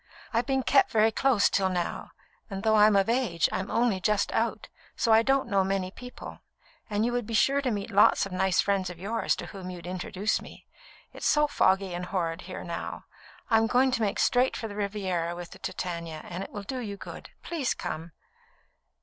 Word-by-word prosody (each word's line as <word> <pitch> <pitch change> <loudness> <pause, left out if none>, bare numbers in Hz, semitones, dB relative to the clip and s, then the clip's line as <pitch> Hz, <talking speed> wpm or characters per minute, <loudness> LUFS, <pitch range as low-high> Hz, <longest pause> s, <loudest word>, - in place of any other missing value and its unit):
I've 235 +1 +1
been 265 -1 +1
kept 275 +1 +4
very 220 0 +3
close 245 -3 +3
till 190 -1 +1
now, 180 -2 -3 0.4
and 195 -1 -5
though 220 -1 +3
I'm 210 -1 +6
of 195 -1 +3
age, 230 -8 +1
I'm 190 - -3
only 230 -5 +1
just 210 +2 +1
out, - - -1 0.3
so 230 - +1
I 220 - +7
don't 270 +1 +2
know 200 -4 +2
many 190 -1 -1
people, 250 +4 -10 0.5
and 210 +1 +1
you 240 - 0
would 245 -3 -2
be 230 - -2
sure 275 +5 +3
to 265 - 0
meet 205 -1 -3
lots 200 0 +5
of 195 - -8
nice 185 0 +2
friends 195 -2 0
of 180 - -8
yours, 210 +6 -1
to - - -6
whom 190 -3 -8
you'd 175 -2 -8
introduce 185 +3 -2
me. - - -13 0.5
It's - - -2
so 300 0 +4
foggy 190 -9 +2
and 180 +1 -4
horrid 165 -4 -2
here 185 - -6
now; 170 -1 -5 0.5
I'm 225 0 +4
going 255 +2 +3
to 250 - -1
make 205 -2 0
straight 250 +1 +2
for 225 - -4
the 205 - -8
Riviera 190 -5 -2
with 175 -1 -8
the - - -12
Titania, 170 -3 -5
and 180 +2 -5
it - - -8
will 205 - -6
do 255 +6 -4
you 205 -4 -5
good. - - -9
Please 305 -8 -1
come." 165 +2 -5
200 Hz, 210 wpm, -28 LUFS, 185-230 Hz, 0.5 s, I